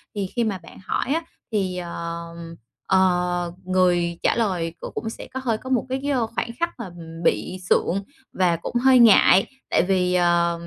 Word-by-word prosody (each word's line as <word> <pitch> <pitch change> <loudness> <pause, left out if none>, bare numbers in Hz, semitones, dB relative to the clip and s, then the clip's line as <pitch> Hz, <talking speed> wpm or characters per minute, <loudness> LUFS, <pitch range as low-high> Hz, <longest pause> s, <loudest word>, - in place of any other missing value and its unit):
Thì 200 -2 -2
khi 240 - +2
mà 205 -4 -2
bạn - - -14
hỏi - - -1
á 330 +2 -1 0.3
thì, 190 -4 -1
ờm, 170 -1 -6 0.3
ờ, 180 -2 +2
người 175 -2 +2
trả - - +3
lời 185 -8 0
c 170 - -30 0.2
cũng 225 - -3
sẽ - - -9
có 260 - -3
hơi 230 -4 0
có 260 - -9
một 255 -4 +1
cái 260 +1 -1
cái, 285 +1 -1
a, 265 - +2 0.2
khoảnh - - -1
khắc 340 - +1
mà 230 - -5 0.3
bị 110 +5 0
sượng 195 +3 +2 0.3
và 180 -2 +2
cũng 170 +8 -7
hơi 255 +1 +5
ngại. 205 -4 +7 0.2
Tại - - +3
vì, 180 -2 +2
à, 175 -1 +3
185 Hz, 190 wpm, -23 LUFS, 170-225 Hz, 0.3 s, ngại